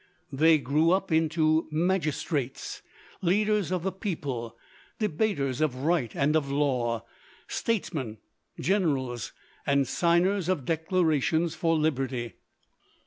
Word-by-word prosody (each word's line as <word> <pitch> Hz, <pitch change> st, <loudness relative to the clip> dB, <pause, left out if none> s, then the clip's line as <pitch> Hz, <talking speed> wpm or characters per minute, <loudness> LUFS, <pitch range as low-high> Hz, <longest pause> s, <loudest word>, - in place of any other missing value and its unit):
They 155 Hz, +4 st, +5 dB
grew 150 Hz, +4 st, +2 dB
up 190 Hz, +1 st, +1 dB
into 160 Hz, 0 st, +2 dB
magistrates, 155 Hz, -5 st, -1 dB, 0.4 s
leaders 205 Hz, +1 st, +2 dB
of 180 Hz, -2 st, -1 dB
the 190 Hz, -, 0 dB
people, 145 Hz, -, -4 dB, 0.4 s
debaters 155 Hz, -, 0 dB
of 150 Hz, -5 st, +1 dB
right 155 Hz, -8 st, +1 dB
and 145 Hz, +2 st, +2 dB
of 145 Hz, -3 st, +1 dB
law, 125 Hz, -5 st, 0 dB, 0.4 s
statesmen, 155 Hz, -, -2 dB, 0.4 s
generals, 140 Hz, -, 0 dB, 0.3 s
and 140 Hz, -1 st, +2 dB
signers 175 Hz, +4 st, +2 dB
of 165 Hz, -9 st, 0 dB
declarations 160 Hz, -1 st, +1 dB
for 165 Hz, -1 st, +1 dB
liberty. 130 Hz, -6 st, -1 dB
155 Hz, 105 wpm, -28 LUFS, 135-175 Hz, 0.4 s, They